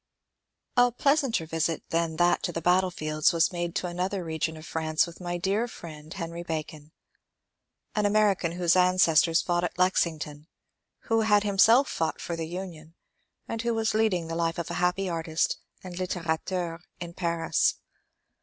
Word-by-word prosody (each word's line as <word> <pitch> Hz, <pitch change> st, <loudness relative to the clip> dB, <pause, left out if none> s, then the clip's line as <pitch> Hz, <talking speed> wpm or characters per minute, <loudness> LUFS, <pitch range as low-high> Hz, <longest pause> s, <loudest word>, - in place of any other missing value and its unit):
A 245 Hz, 0 st, +5 dB
pleasanter 270 Hz, -, +1 dB
visit 165 Hz, 0 st, -1 dB
than 165 Hz, -1 st, 0 dB
that 175 Hz, +1 st, +3 dB
to -, -, -2 dB
the 165 Hz, -, -3 dB
battlefields 170 Hz, -3 st, +2 dB
was 165 Hz, +2 st, +2 dB
made 175 Hz, -1 st, -3 dB
to -, -, -1 dB
another 180 Hz, +2 st, -2 dB
region 160 Hz, 0 st, -3 dB
of 155 Hz, -, -11 dB
France 160 Hz, -1 st, 0 dB
with 170 Hz, +1 st, -12 dB
my 175 Hz, 0 st, -3 dB
dear 200 Hz, +6 st, 0 dB
friend 155 Hz, -7 st, -10 dB
Henry 170 Hz, -2 st, -5 dB
Ba 160 Hz, -2 st, -2 dB
con, 150 Hz, 0 st, -14 dB, 0.5 s
— -, -, -49 dB
an 210 Hz, -1 st, +2 dB
American 205 Hz, -5 st, +2 dB
whose 175 Hz, -1 st, +2 dB
ancestors 180 Hz, -3 st, +4 dB
fought 175 Hz, 0 st, 0 dB
at 175 Hz, -, -3 dB
Lexington, 160 Hz, -5 st, 0 dB, 0.5 s
who 225 Hz, -1 st, +1 dB
had 210 Hz, -2 st, +4 dB
himself 225 Hz, +6 st, +5 dB
fought 160 Hz, -1 st, -2 dB
for 170 Hz, -, -4 dB
the 165 Hz, -1 st, -4 dB
Union, 170 Hz, -2 st, -8 dB, 0.5 s
and 230 Hz, -, -3 dB
who 235 Hz, 0 st, 0 dB
was 225 Hz, -1 st, 0 dB
leading 215 Hz, -6 st, +1 dB
the 165 Hz, -, -4 dB
life 165 Hz, 0 st, -1 dB
of 170 Hz, -, -4 dB
a -, -, -2 dB
happy 180 Hz, +2 st, +1 dB
artist 165 Hz, -2 st, -1 dB, 0.2 s
and 180 Hz, -2 st, -8 dB
litterateur 175 Hz, -1 st, -2 dB, 0.2 s
in 170 Hz, -1 st, -7 dB
Paris. 170 Hz, -2 st, +1 dB
175 Hz, 165 wpm, -27 LUFS, 165-190 Hz, 0.5 s, A